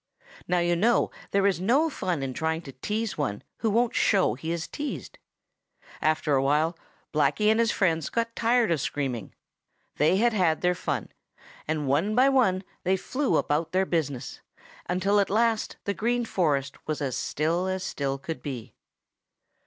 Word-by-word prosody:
Now 180 - +2
you 175 0 +2
know 225 +7 +2 0.2
there 200 0 +2
is 195 -3 +2
no 265 - +3
fun 180 - -2
in 130 -1 -3
trying 160 +3 -1
to 135 - -9
tease 210 - -3
one 105 -8 -2
who 225 - 0
won't 235 +3 +2
show 190 - +3
he 160 +7 -5
is 170 -1 -3
teased. 295 0 -6 0.8
After 155 -1 +1
a 135 - +4
while 150 +5 +2 0.4
Blacky 210 +8 +3
and 220 - +2
his 230 -1 +3
friends 165 -5 +1
got 230 0 -2
tired 235 -2 +2
of 160 -5 +1
screaming. 125 -8 -3 0.6
They 155 +5 +4
had 235 +2 +3
had 175 -6 +2
their 180 0 +3
fun, 145 - -3 0.6
and 155 -2 -1
one 165 +11 +1
by 260 +3 +5
one 220 -9 +3 0.2
they 190 +1 +2
flew 265 +8 0
about 160 +3 0
their 190 +1 +3
business 145 -8 -2 0.5
until 190 +3 +2
at 200 - +2
last 225 +1 +1
the 200 - -1
Green 240 +3 0
Forest 145 -10 -1
was 155 -1 -2
as 135 -4 -2
still 165 +5 -1
as 190 0 -2
still 140 -6 -2
could 160 +4 -6
be. 125 -5 -6
175 Hz, 170 wpm, -27 LUFS, 150-215 Hz, 0.8 s, by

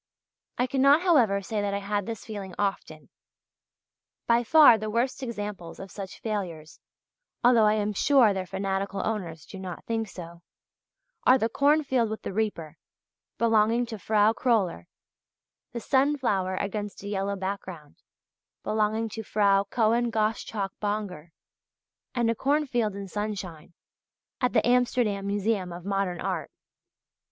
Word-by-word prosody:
I 250 - +2
cannot, 275 +5 +4
however, 235 - +3
say 210 +2 -2
that 200 0 -1
I - - 0
had 205 0 -2
this 225 -3 -6
feeling 200 -4 -7
often. 195 -6 -3 1.2
By 235 +1 +3
far 295 0 +7
the 215 0 -4
worst 240 +5 -1
examples 210 -8 -6
of 195 -1 -9
such 195 -3 -8
failures 180 -8 -5 0.6
(although 235 -2 +6
I 210 - +3
am 210 0 -1
sure 245 -2 +4
their 190 -1 -4
fanatical 195 +1 -2
owners 175 -9 -4
do 190 - -10
not 185 -3 -7
think 225 -1 -2
so) 170 -3 -10 0.8
are 255 - +6
the 225 -2 0
"Cornfield 280 -3 +2
with 220 - -6
the - - -5
Reaper," 195 -7 -3 0.6
belonging 230 +1 +3
to 225 -2 -7
Frau 215 +3 +3
Kröller, 215 - 0 0.9
the 235 - -4
"Sunflower 255 -8 +1
against 205 +1 -4
a - - -6
Yellow 200 0 -2
Background," 190 -5 -6 0.7
belonging 215 +1 0
to 220 +1 -6
Frau 200 -2 +2
Cohen 230 +3 +1
Gosschalk 215 -2 -2
Bonger, 205 -6 -3 0.9
and 240 -2 +1
"A - - +1
Cornfield 255 -5 0
in 200 -1 -6
Sunshine," 185 -5 -5 0.7
at 250 - +1
the - - +3
Amsterdam 240 -5 +1
Museum 200 -2 -1
of 175 +1 -9
Modern 195 -3 -1
Art. 180 -5 -3
210 Hz, 140 wpm, -27 LUFS, 195-230 Hz, 1.2 s, far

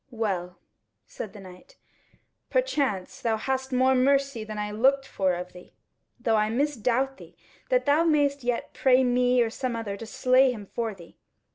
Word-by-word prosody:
"Well," 190 -7 -3 0.5
said 190 - -8
the 210 - -11
knight, 190 - -14 0.7
"perchance 280 - -1
thou 225 -2 0
hast 265 +3 -3
more 260 +1 +3
mercy 275 -2 +2
than 215 0 -7
I 210 0 -3
looked 270 +6 +2
for 190 -8 0
of 180 +1 -7
thee; 180 0 -15 0.4
though 225 -2 +1
I 215 0 +1
misdoubt 265 +1 0
thee - - -15 0.3
that - - +2
thou 295 +3 +4
mayst 290 -4 +2
yet 245 -1 -2
pray 260 0 +4
me 250 0 +3
or 225 - -3
some 250 0 -3
other 220 -3 -4
to 225 - -8
slay 255 +3 +3
him 215 -4 -7
for 225 +1 -4
thee. 170 -3 -16
245 Hz, 170 wpm, -26 LUFS, 210-270 Hz, 0.7 s, thou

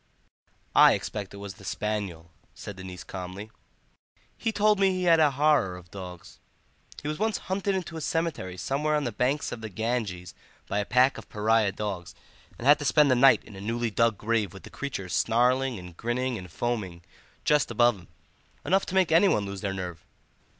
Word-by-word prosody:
"I - - +8
expect 105 -3 -4
it 100 - -10
was 100 -1 -7
the - - -16
spaniel," 100 -6 -4 0.2
said 105 - -8
the 95 - -10
niece 90 -1 -8
calmly; 95 +3 -7 0.8
"he 225 - -1
told 210 -1 +3
me 195 -1 +5
he 185 -1 -1
had 170 -2 +5
a 155 -2 +6
horror 140 -10 +2
of 90 -1 -15
dogs. 90 -3 -10 0.6
He - - -4
was 150 +2 -3
once 220 -1 +1
hunted 195 +1 0
into 170 -3 -4
a - - -5
cemetery 155 - -2
somewhere 150 +8 0
on 150 - 0
the 120 - -2
banks 130 +7 0
of 115 - -6
the 110 - -5
Ganges 105 -4 -3 0.3
by 100 - -1
a 105 - -1
pack 125 +4 +3
of - - -14
pariah 110 -1 +2
dogs, 100 -4 -5 0.4
and 115 - -7
had 145 +2 +7
to 145 - -4
spend 145 0 +4
the - - +5
night 135 +2 +6
in 105 - -13
a 95 - -9
newly 115 +2 -2
dug 115 -1 +2
grave 110 -3 0
with 95 - -11
the - - -12
creatures 95 -11 -5
snarling 125 +4 +2
and 90 -2 -10
grinning 125 +2 -1
and 90 -5 -8
foaming 95 -5 -3 0.4
just 150 -3 +3
above 120 0 +4
him. 85 - -16 0.6
Enough 195 +2 +2
to 190 - -4
make 190 -2 +3
anyone 165 - +4
lose 100 -1 -6
their 100 - -2
nerve." 90 -4 -6
115 Hz, 200 wpm, -27 LUFS, 95-145 Hz, 0.8 s, I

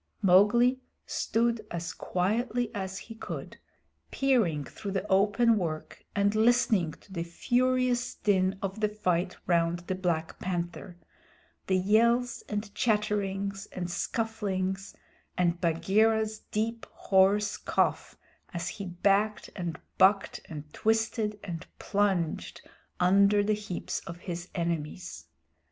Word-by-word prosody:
Mowgli 210 +7 +5 0.3
stood 230 -1 0
as 170 0 -4
quietly 230 +6 -1
as 190 -1 -4
he 225 - -9
could, 225 - -7 0.5
peering 225 - +2
through 200 +9 -7
the 195 +1 -2
open 205 +3 +4
work 155 -4 -5
and 200 0 +2
listening 220 -7 +3
to 190 - -16
the 170 - -2
furious 245 +7 +1
din 190 -1 +1
of 195 +2 -3
the 210 -1 +2
fight 185 -3 -1
round 170 0 +1
the 185 - -1
Black 175 -4 -2
Panther 175 0 -4 0.7
the 190 - +3
yells 235 +5 +3
and 210 0 -3
chatterings 200 -2 0
and 180 -1 -4
scufflings, 195 -3 -2 0.4
and 175 -1 +1
Bagheera's 215 +6 +2
deep, 225 +2 -2
hoarse 195 +1 +3
cough - - 0 0.4
as 170 +2 -2
he 200 - -6
backed 200 +4 +1
and 175 -4 -4 0.2
bucked 195 +1 +4
and 150 -2 -6
twisted 220 -1 0
and 170 -4 -6
plunged 195 -6 -1 0.3
under 200 +3 +5
the 215 +1 +2
heaps 205 -4 -4
of 170 +1 -8
his 175 -1 -5
enemies. 165 - -3
195 Hz, 120 wpm, -29 LUFS, 180-220 Hz, 0.7 s, Mowgli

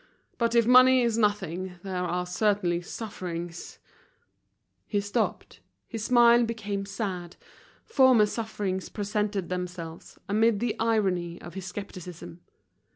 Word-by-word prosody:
But 235 0 +1
if 235 -1 +5
money 255 +1 +7
is 235 -2 +1
nothing, 190 -4 -1
there 185 -2 -3
are 180 0 -1
certain 180 -2 +1
sufferings—" 175 -4 -6 1.1
He 205 - 0
stopped, 205 0 -2 0.3
his 225 -3 -5
smile 240 -1 +6
became 210 -4 -3
sad, 190 -4 -4 0.5
former 260 - +5
sufferings 205 -4 -3
presented 205 -2 -2
themselves 180 -2 -6
amid 215 +1 +3
the 235 0 -1
irony 190 -7 0
of 175 - -10
his 190 -1 -6
skepticism. 180 -3 -8
200 Hz, 115 wpm, -27 LUFS, 180-225 Hz, 1.1 s, money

